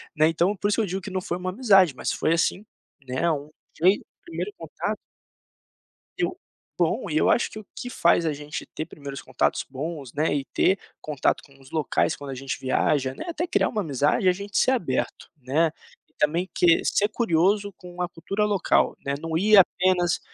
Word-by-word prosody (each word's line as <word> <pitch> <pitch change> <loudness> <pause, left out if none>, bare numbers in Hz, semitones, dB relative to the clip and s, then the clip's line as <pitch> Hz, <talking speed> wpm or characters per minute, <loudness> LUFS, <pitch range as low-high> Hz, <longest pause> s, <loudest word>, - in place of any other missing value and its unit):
né. 155 0 +4
Então, 170 +5 +1
por 205 +1 -1
isso 210 - +1
eu 215 - +1
digo 190 +1 -3
que 190 +2 -7
não 185 - -2
foi 175 -1 -3
uma 185 0 -3
amizade, 195 - +5
mas - - -2
foi, 160 - +1
assim, 180 +4 0 0.4
né, 130 0 -3 0.6
foi 185 +5 +5
um - - -17 0.2
primeiro 175 +5 -5
contato 205 +6 -4 1.2
Eu 365 0 -1 0.4
bom, - - +1
e - - -1
eu - - +4
acho - - +2
que - - -8
o 215 - -11
que 245 - -6
faz 170 -5 +3
a 155 - +1
gente 150 +1 -6
ter 155 - -4
primeiros 140 -2 -8
contatos 130 -1 0
bons, 140 -1 -6
né, 150 0 +1
e 140 - -1
ter 190 - +2 0.2
contato 150 -3 0
com 140 -1 -20
os 135 - -17
locais 155 -3 +1
quando 145 -1 -8
a 135 - -4
gente 135 +1 -4
viaja, 130 0 +1
né, - - -7
até 340 +1 -2
criar - - +2
uma 215 - -1
amizade, 145 +1 +1
é - - +7
a - - +3
gente 200 +2 -3
ser 260 - +4
aberto, 240 -9 -2
né. 150 +6 +2 0.4
E - - -35
também 165 +5 +1
que 170 -2 +4
ser 205 - +2
curioso 200 -1 +1
com 180 0 -11
a 175 - -1
cultura 185 +5 -2
local, 205 -4 +2
né, 140 - -1
não 160 0 -3
ir 210 +4 +5
apenas 180 -2 +4
175 Hz, 205 wpm, -25 LUFS, 150-200 Hz, 1.2 s, é